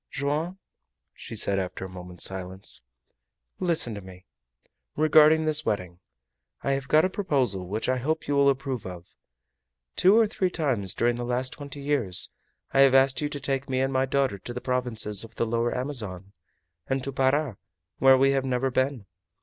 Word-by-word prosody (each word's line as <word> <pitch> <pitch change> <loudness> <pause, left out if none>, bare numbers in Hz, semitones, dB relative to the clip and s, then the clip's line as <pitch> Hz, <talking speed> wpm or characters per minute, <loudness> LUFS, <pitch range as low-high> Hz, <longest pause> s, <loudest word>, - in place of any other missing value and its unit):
"Joam," 150 +6 -2 0.6
said - - -9
she, - - +3
after 95 -1 -2
a - - -6
moment's 90 -1 -8
silence, 95 0 -3 0.8
"listen 165 -10 +1
to 100 - -7
me. 95 0 -13 0.7
Regarding 155 +1 +5
this 155 0 +2
wedding, 90 - -3 0.6
I 140 - 0
have 135 -1 -2
got 155 +4 +4
a - - +3
proposal 130 - -1
which 105 +4 -3
I 130 - +1
hope 155 +6 -2
you 145 - 0
will 140 0 +5
approve 135 -3 -2
of. 90 -1 -10 0.8
Two 195 +4 +5
or 230 - +6
three 195 -3 -1
times 120 - -1
during 120 0 +1
the 120 - -4
last 125 +1 -1
twenty 145 -1 -8
years 120 -10 +2 0.4
I 135 - +1
have 135 -1 +6
asked 135 +2 +4
you 145 - -1
to 145 - -5
take 135 0 -2
me 130 -1 0
and 135 +1 0
my 130 0 +1
daughter 135 -6 0
to 120 - -7
the - - -3
provinces 120 -5 -1
of 115 0 -12
the - - 0
Lower 115 +2 -1
Amazon, 105 -8 -4 0.5
and 135 0 -1
to 140 - -3
Para, 135 -3 +1 0.4
where 135 0 +7
we 135 +1 +4
have 135 -1 +1
never 130 0 0
been. 130 -4 -1
130 Hz, 180 wpm, -26 LUFS, 105-140 Hz, 0.8 s, where